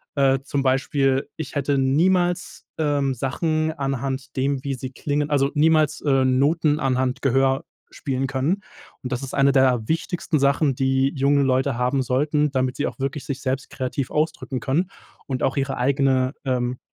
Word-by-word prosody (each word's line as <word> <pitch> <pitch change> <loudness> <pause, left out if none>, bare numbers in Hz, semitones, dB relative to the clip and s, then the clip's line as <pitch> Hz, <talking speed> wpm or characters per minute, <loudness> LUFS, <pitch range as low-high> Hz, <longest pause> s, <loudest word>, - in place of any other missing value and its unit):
Äh, 135 -1 +3
zum 140 0 -1
Beispiel 135 0 +1
ich 155 -2 -7
hätte 145 0 +1
niemals, 175 +7 +1
ähm, 145 -3 +1
Sachen 155 +5 -1
anhand 135 -1 -4
dem, 135 0 0
wie 140 -2 -2
sie 130 +1 -6
klingen 145 +2 -2
also, 140 -1 +2
niemals, 155 -1 +3
äh, 135 -3 +2
Noten 145 +4 +2
anhand 130 -2 0
Gehör 135 0 +2 0.3
spielen 135 -1 -3
können 140 +9 -1 0.4
und 125 - -5
das 125 +1 -2
ist 135 - -7
eine 140 0 +4
der 130 -4 +3
wichtigsten 165 0 -1
Sachen, 140 0 +2
die 135 +1 +1
junge 140 +1 +3
Leute 130 0 +1
haben 125 +2 +1
sollten, 145 +3 +1
damit 130 -1 0
sie 145 - -1
auch - - -5
wirklich 135 +1 -3
sich 140 -1 -4
selbst 130 0 -3
kreativ 130 +1 -3
ausdrücken 150 -4 -1
können 170 +10 -1 0.3
und 130 -2 -3
auch 135 - 0
ihre 135 -1 -1
eigene, 130 0 +2
ähm 125 -1 -1
135 Hz, 165 wpm, -23 LUFS, 130-145 Hz, 0.4 s, eine